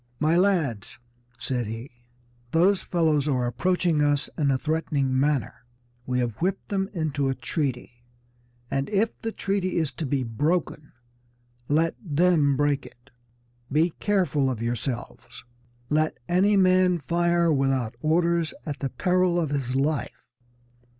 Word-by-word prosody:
"My 155 +2 +2
lads," 165 - +1 0.4
said 125 -2 -2
he, 115 +5 -7 0.6
"those 185 +4 +4
fellows 155 -4 +1
are 130 -4 +1
approaching 170 +5 +1
us 145 -1 +1
in 145 -3 +1
a 135 - +2
threatening 140 -3 0
manner. 140 -4 0 0.4
We 125 0 0
have 120 -4 -1
whipped 190 +2 -1
them 195 -1 -1
into 150 -6 -1
a 135 - -1
treaty, 125 -6 -3 0.7
and 135 0 -1
if 215 +2 +1
the 225 - -3
treaty 195 -3 -1
is 160 -4 0
to 160 - -5
be 135 -1 0
broken 150 +5 -1 0.8
let 160 +3 +2
them 155 -4 +2
break 145 -1 0
it. 120 +2 -20 0.6
Be 160 +4 +3
careful 180 -10 +1
of 125 -4 -3
yourselves. 120 0 -5 0.5
Let 155 +1 +1
any 195 +4 +3
man 185 -1 +4
fire 170 +1 +1
without 135 -4 0
orders 170 +1 +1
at 145 -4 -5
the 135 - -2
peril 180 +2 +1
of 160 -4 -1
his 130 -3 -2
life. 145 +2 -1
150 Hz, 135 wpm, -25 LUFS, 135-175 Hz, 0.8 s, those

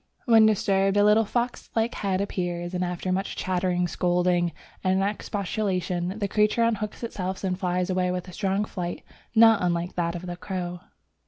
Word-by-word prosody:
When 225 -3 +6
disturbed 195 -1 +2
a 205 - +5
little 210 +2 +5
fox 240 +3 -2
like 225 +1 +1
head 195 -2 -1
appears, 175 -3 -3
and 180 0 -1
after 180 +1 -2
much 195 +1 -1
chattering, 180 -1 0
scolding, 175 0 +1 0.3
and 190 +1 +2
expostulation, 195 -2 -2
the 205 -2 -1
creature 210 +3 +2
unhooks 215 -1 -1
itself 190 -5 -4
and 185 -1 0
flies 180 0 0
away 185 0 +1
with 180 0 -3
a 180 - -10
strong 200 +1 0
flight 175 -4 -5 0.3
not 225 -1 +7
unlike 175 0 -1
that 170 0 0
of 175 +1 -6
a 175 - -4
crow. 180 -1 -5
185 Hz, 170 wpm, -26 LUFS, 180-210 Hz, 0.3 s, not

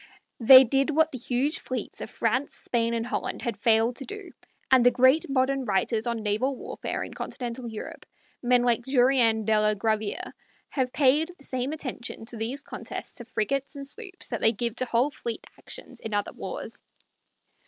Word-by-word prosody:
They 260 +3 +10
did 270 +3 +1
what 315 +1 +3
the 255 - -6
huge 265 +6 0
fleets 255 -4 -5
of - - -5
France, 250 +6 -1
Spain, 235 -1 -1
and 230 0 -1
Holland - - -3
had 235 -3 -2
failed 225 +3 +2
to 270 - -4
do, 410 -4 -8 0.4
and 260 -2 +7
the 245 - +7
great 260 +5 +4
modern 270 0 +1
writers 215 +2 0
on 235 -2 -2
naval 220 +6 0
warfare - - -4
in - - -8
Continental 240 0 -5
Europe 220 -1 -8 0.3
men 245 0 +3
like 240 -1 +2
Jurien 245 -4 +3
de 215 0 +3
la 210 0 +3
Graviere 220 - -2 0.4
have 260 -3 -1
paid 295 +4 +3
the 280 - -15
same 260 0 -2
attention 255 -7 -5
to 230 0 -5
these 245 +6 -3
contests - - -7
of 235 - -11
frigates 275 +6 -1
and 280 0 -6
sloops 380 +5 -5
that 235 - -3
they 225 - +4
give 235 +1 -2
to 255 - +1
whole 245 +4 +1
fleet 235 -4 -5
actions - - -9
of 220 - -5
other 205 - -1
wars. - - -7
245 Hz, 185 wpm, -27 LUFS, 225-275 Hz, 0.4 s, They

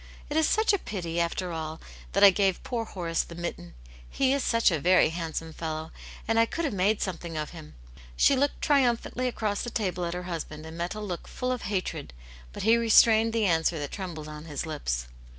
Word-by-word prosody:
It - - -2
is 315 -1 +4
such 435 0 +3
a 400 - +2
pity, 170 - -4
after 170 +1 -1
all, 160 -1 -5 0.3
that 200 - +3
I 200 - +10
gave 190 -1 +1
poor 235 -2 -2
Horace 170 -5 -2
the 170 - -9
mitten. 165 - -6 0.3
He 270 -1 +2
is 280 -2 0
such 230 -4 +3
a 165 - 0
very 180 +3 +5
handsome 165 -1 -4
fellow, 160 -1 -4 0.4
and 225 +1 +2
I 230 - +5
could 335 +6 -2
have 280 - -1
made 200 +3 +2
something 170 -3 -5
of 150 0 -3
him.*' 160 -3 -11 0.4
She 275 - +5
looked 280 +2 0
triumphantly 255 -2 +2
across 215 -4 -1
the 240 - -3
table 185 -6 -2
at 170 +1 -3
her 180 - -4
husband, 160 -3 -6
and 160 0 -9
met 170 +4 -3
a - - -5
look 185 -5 -5
full 250 0 -3
of 250 -6 -3
hatred, 185 - -3 0.4
but - - -6
he 225 +3 +5
re 230 -1 -1
strained 225 0 +6
the 225 -1 +1
answer 165 -2 +2
that 145 -2 -4
trembled 170 -6 -6
on 150 0 -8
his 150 -2 -4
lips. 60 - -2
180 Hz, 220 wpm, -27 LUFS, 160-225 Hz, 0.4 s, I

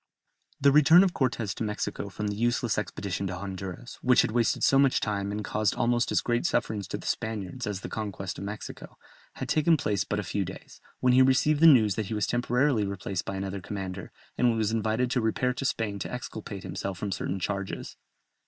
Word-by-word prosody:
The 140 +1 +5
return 150 +5 +7
of 185 -3 +1
Cortès 120 -6 -1
to - - -4
Mexico 105 -1 -3
from 105 +3 -5
the 105 - -3
useless 120 0 +1
expedition 100 -1 -3
to 95 - -4
Honduras 95 +4 -7
which 125 -1 +5
had - - -1
wasted 115 -1 +1
so 135 - +5
much 135 -2 +4
time 100 -2 -2
and 105 0 -4
caused 105 -2 0
almost 120 0 +1
as - - +2
great 120 0 0
sufferings 110 - -1
to - - -4
the - - -11
Spaniards 110 +2 -3
as 100 -2 -3
the - - -5
conquest 100 -4 -5
of - - -6
Mexico 105 +1 -8 0.4
had - - -5
taken 160 +1 +3
place 105 -9 0
but 105 - -3
a - - -2
few 100 +1 -1
days, - - -10 0.2
when 125 -1 +4
he 130 - +6
received 135 +3 +4
the 165 - +8
news 115 -9 +6
that 110 -3 -2
he 110 - -3
was 105 - +1
temporarily 125 0 +1
replaced 100 -1 -4
by 100 - -4
another 95 0 -4
commander, 95 -1 -6 0.3
and 120 -2 +3
was 110 -1 +1
invited 115 +3 0
to 125 - +1
repair 125 +3 +1
to 135 - -4
Spain 105 -5 -1
to - - -5
exculpate 110 -5 -6
himself 95 -2 -4
from 100 +1 -4
certain 95 +1 -2
charges. 100 +1 -4
110 Hz, 210 wpm, -28 LUFS, 100-125 Hz, 0.4 s, the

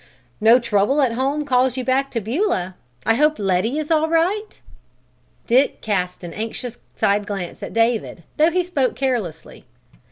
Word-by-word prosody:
No 225 +3 +6
trouble 230 +3 +1
at 255 - +2
home 275 +5 -1
calls 255 -1 +2
you 255 - -2
back 265 +2 +1
to 235 - -2
Beulah? 225 - -1 0.3
I 225 - +4
hope 300 +5 +2
Letty 200 +7 0
is 310 +1 -3
all 320 0 +3
right?" 370 +6 0 0.9
Dick 260 +4 +2
cast 180 -4 -2
an 170 -1 -7
anxious 230 +2 -5 0.2
side 205 +1 +1
glance 195 -4 -5
at - - -6
David, 225 -6 0
though 310 +2 +5
he 360 +2 +1
spoke 285 -8 -1
carelessly. 230 - -3
250 Hz, 160 wpm, -21 LUFS, 210-295 Hz, 0.9 s, No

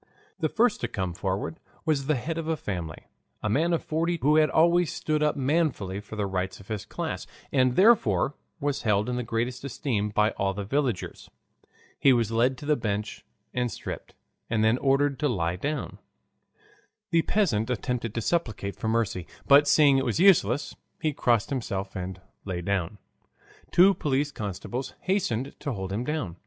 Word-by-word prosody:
The 160 -3 +1
first 235 +4 +2
to - - 0
come 95 -3 -3
forward 95 - -3 0.3
was 145 -4 +1
the 155 - +3
head 160 +6 -3
of 160 - -4
a 160 -1 0
family, 85 - -5 0.4
a 110 - 0
man 160 +9 +2
of 170 - 0
forty 165 +2 0
who 150 +3 +4
had 155 -1 +5
always 170 +2 +3
stood 155 -1 -1
up 150 0 +2
manfully 135 - 0
for 105 +1 -9
the 105 -2 -1
rights 95 -1 -3
of 100 - -15
his 110 -3 -4
class, - - -4 0.2
and 130 -2 +3
therefore 150 - +4 0.3
was 145 -1 -1
held 105 -1 +1
in 125 - -1
the 125 - -1
greatest 120 +2 -2
esteem 115 -6 -2
by 105 +1 +2
all 95 -1 -1
the 100 - -3
villagers. 125 -2 -2 0.7
He 135 - +6
was 115 -3 +1
led 120 +3 +2
to 145 - -9
the 150 0 +3
bench 105 -4 -3 0.3
and 125 -1 -1
stripped, - - -7 0.3
and 110 -1 +1
then 110 +3 +3
ordered 140 0 +2
to 150 - +2
lie 85 -7 0
down. 145 +11 -4 1.1
The 165 -1 +4
peasant 130 - +1
attempted 125 -2 -2
to 115 - -1
supplicate 110 - -1
for - - -3
mercy, 110 -6 0 0.2
but 145 +1 +7
seeing 145 -2 +5
it 135 - -1
was 120 +5 0
useless, 145 - +4 0.2
he 155 -4 0
crossed 120 -4 +1
himself 100 -7 -3
and 95 0 -5 0.2
lay 90 -3 -4
down. 100 +1 -1 0.7
Two 190 +3 +6
police 145 -3 0
constables 110 +4 -5
hastened 140 - -1
to 140 -3 -3
hold 95 -2 -4
him 110 +4 -1
down. 125 - -3
125 Hz, 180 wpm, -27 LUFS, 105-150 Hz, 1.1 s, but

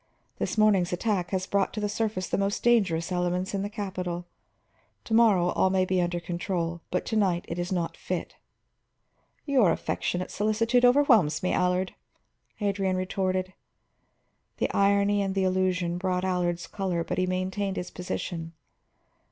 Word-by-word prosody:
This - - -2
morning's 200 -5 +4
attack 180 -1 -1
has 185 0 -1
brought 200 0 0
to 215 - -3
the 210 - 0
surface 210 -3 -2
the - - -1
most 200 +1 -1
dangerous 190 -8 +2
elements 180 +2 -1
in 195 - -1
the 200 - -3
capital. 185 -4 -4 0.8
To 225 - -5
morrow 210 -6 +5
all 190 - +2
may 185 0 +2
be 185 -1 +1
under 175 0 -1
control, 170 -1 -3
but 180 - -1
to 220 - -2
night 185 -5 +1
it 170 - -4
is 175 +1 -3
not 175 -3 -1
fit." - - -4 1.1
"Your 255 - +4
affectionate 180 +2 -2
solicitude 230 +4 +2
overwhelms 245 - +4
me, 185 - +1
Allard," 180 +1 +1 0.7
Adrian 195 -2 0
retorted. 185 0 -1 1.0
The - - 0
irony 200 +1 +3
and 195 -1 -2
the 195 - +1
allusion 185 -2 0
brought 185 0 -1
Allard's 175 -2 -1
color, 185 -4 -2
but 165 - -3
he 185 - +1
maintained 190 +2 -2
his 180 - -4
position. 170 -2 -5
185 Hz, 155 wpm, -27 LUFS, 180-200 Hz, 1.1 s, morrow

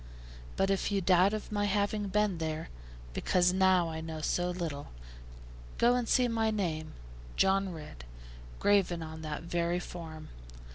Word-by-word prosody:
But 195 0 +2
if 195 +1 0
you 200 - +2
doubt 185 +1 +4
of 215 0 -5
my 205 -1 0
having 205 +1 0
been 205 -3 +1
there, 160 0 -3 0.4
because 180 - +2
now 185 -2 +4
I 160 0 -5
know 160 -1 -5
so 175 +3 0
little, 165 -5 -4 0.9
go 240 +1 +4
and 245 -2 -1
see 250 -2 +4
my 225 -1 +1
name, 170 -7 -2 0.4
'John 195 0 +2
Ridd,' 150 - -9 0.5
graven 190 -5 +2
on 160 0 -8
that 155 0 -5
very 170 +1 0
form. 165 -3 -8
180 Hz, 150 wpm, -31 LUFS, 160-205 Hz, 0.9 s, doubt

